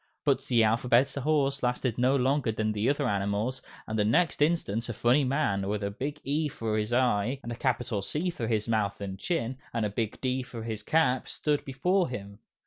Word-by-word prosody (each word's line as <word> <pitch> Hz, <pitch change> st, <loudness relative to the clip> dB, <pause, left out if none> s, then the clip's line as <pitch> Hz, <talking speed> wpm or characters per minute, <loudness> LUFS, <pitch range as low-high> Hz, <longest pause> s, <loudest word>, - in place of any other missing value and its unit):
But 135 Hz, -2 st, +2 dB
the 120 Hz, -4 st, +3 dB
Alphabet 120 Hz, +4 st, +3 dB
Horse 140 Hz, -1 st, +1 dB
lasted 125 Hz, -1 st, -1 dB
no 130 Hz, +2 st, +4 dB
longer 135 Hz, -1 st, +2 dB
than 110 Hz, 0 st, -1 dB
the 105 Hz, +3 st, 0 dB
other 145 Hz, -, +1 dB
animals, 100 Hz, +5 st, -1 dB, 0.2 s
and 110 Hz, 0 st, -3 dB
the -, -, +4 dB
next 155 Hz, +10 st, +2 dB
instant 125 Hz, -8 st, +1 dB
a -, -, -2 dB
funny 120 Hz, +6 st, +3 dB
man, 125 Hz, -8 st, 0 dB
with 105 Hz, 0 st, -2 dB
a 100 Hz, -, -1 dB
big 145 Hz, +8 st, -4 dB
E 150 Hz, +3 st, 0 dB
for 115 Hz, -6 st, -3 dB
his 105 Hz, +2 st, -2 dB
eye 120 Hz, -5 st, +3 dB
and 120 Hz, -, -1 dB
nose 140 Hz, -, -8 dB
and 120 Hz, -, -5 dB
a -, -, -3 dB
capital 120 Hz, -4 st, -1 dB
C 160 Hz, -, -2 dB
for 115 Hz, -9 st, -4 dB
his 110 Hz, -2 st, 0 dB
mouth 110 Hz, -3 st, 0 dB
and 95 Hz, -2 st, -5 dB
chin, 130 Hz, -, -2 dB
and 115 Hz, -2 st, -1 dB
a 105 Hz, -, -2 dB
big 110 Hz, 0 st, -3 dB
D 130 Hz, 0 st, 0 dB
for 125 Hz, -3 st, -7 dB
his 110 Hz, -2 st, -4 dB
cap, 130 Hz, 0 st, +2 dB
stood 150 Hz, -1 st, -1 dB
before 175 Hz, +7 st, +1 dB
him. 100 Hz, -4 st, -7 dB
120 Hz, 220 wpm, -28 LUFS, 110-140 Hz, 0.2 s, no